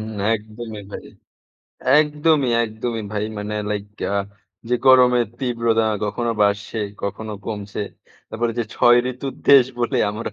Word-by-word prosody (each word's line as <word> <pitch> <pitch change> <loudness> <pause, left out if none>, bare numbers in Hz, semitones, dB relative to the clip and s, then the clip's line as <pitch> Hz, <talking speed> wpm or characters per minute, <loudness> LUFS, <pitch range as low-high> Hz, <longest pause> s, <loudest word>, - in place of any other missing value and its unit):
হু। 100 - -4
একদমই 110 0 -6
ভাই। - - -7 0.9
একদমই, 150 -2 +2
একদমই 110 +1 -4
ভাই। 105 0 -1
মানে 105 +1 -4 0.2
লাইক 105 -1 -2 0.3
আ - - 0 0.5
যে 125 - +2
গরমের 125 -2 +6
তীব্রতা 115 -3 +1 0.2
কখনো 115 +3 -2
বাড়সে, 100 +2 0 0.2
কখনো 105 +2 -4
কমছে। 105 -2 -5 0.5
তারপরে 115 +1 -2
যে 120 - +1
৬ 120 0 +5
ঋতুর 130 +2 -6
দেশ 140 -3 +8 0.2
বলে 120 - 0
আমরা 110 +3 -5
115 Hz, 135 wpm, -21 LUFS, 105-125 Hz, 0.9 s, দেশ